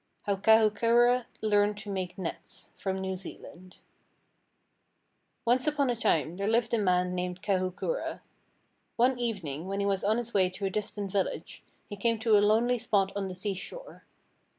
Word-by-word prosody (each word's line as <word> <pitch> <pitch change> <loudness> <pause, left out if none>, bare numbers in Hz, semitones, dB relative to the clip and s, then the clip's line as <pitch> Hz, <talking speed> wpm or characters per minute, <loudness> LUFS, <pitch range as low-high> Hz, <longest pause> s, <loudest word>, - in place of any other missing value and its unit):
HOW 200 -1 0
KAHUKURA 230 +3 +4 0.2
LEARNED 205 -1 +2
TO 205 -1 -7
MAKE 185 -2 -4
NETS 180 -4 -7
From 190 -1 -3
New 190 0 -3
Zealand 185 0 -11 1.7
Once 250 +4 +2
upon 285 -4 +2
a - - -1
time 170 -7 0
there 200 +1 -2
lived 225 +1 +1
a 230 - +3
man 180 -2 +2
named 180 0 -4
Kahukura. 190 - -2 0.7
One 245 +1 +2
evening, 185 - -3
when 195 +1 -2
he 200 - 0
was 195 -1 0
on 215 +3 +2
his 235 -1 -4
way 185 -2 +3
to 190 +2 -5
a 190 - -1
distant 205 -1 -3
village, 195 -1 -2 0.3
he 205 - -6
came 230 +3 +1
to 220 -1 +3
a 205 - +6
lonely 230 +4 +3
spot 195 -3 +1
on 200 -1 -2
the 185 - -6
seashore. 205 - -6
205 Hz, 165 wpm, -29 LUFS, 190-230 Hz, 1.7 s, a